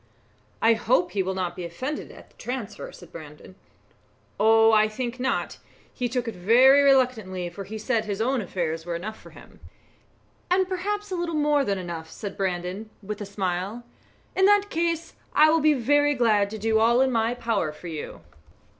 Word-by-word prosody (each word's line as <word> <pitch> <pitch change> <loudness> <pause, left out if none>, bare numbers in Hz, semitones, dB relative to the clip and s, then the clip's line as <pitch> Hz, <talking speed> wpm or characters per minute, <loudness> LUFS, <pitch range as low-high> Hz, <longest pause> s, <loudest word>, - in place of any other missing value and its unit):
"I 225 +1 +6
hope 215 -6 +1
he 195 - 0
will 190 0 -2
not 180 -2 -3
be 180 - -6
offended 255 - -5
at - - -15
the - - -31
transfer," 245 -4 -6
said 175 -2 -14
Brandon. 155 0 -11 0.9
"Oh! 225 +1 +5
I 215 -1 +5
think 240 +3 -5
not; 260 +1 -2 0.3
he 245 -1 -2
took 250 0 -2
it 230 - -3
very 245 +10 +5
reluctantly, 235 -10 +2
for 195 +3 -8
he 220 +3 -7
said 220 0 -1
his 205 -1 -4
own 250 +2 +1
affairs 165 -4 -3
were 170 0 -4
enough 215 +6 -6
for - - -14
him." - - -16 0.9
"And 370 +1 +2
perhaps 410 +2 -3
a - - -1
little 345 -2 -2
more 295 -1 +2
than 200 -6 -1
enough," 170 -3 -6
said 200 +3 -7
Brandon, 185 +2 -3
with 210 +1 -6
a 205 - -5
smile. 195 +3 -3 0.5
"In 380 - +4
that 410 0 +3
case 335 0 -1 0.2
I 310 +1 +6
will 325 0 +3
be 305 0 +4
very 290 +4 +2
glad 215 -5 +2
to 220 - -6
do 220 +1 +1
all 235 +3 +4
in 265 0 +2
my 230 0 +1
power 220 -10 -1
for 150 - -15
you." 160 -3 -6
225 Hz, 190 wpm, -25 LUFS, 185-265 Hz, 0.9 s, I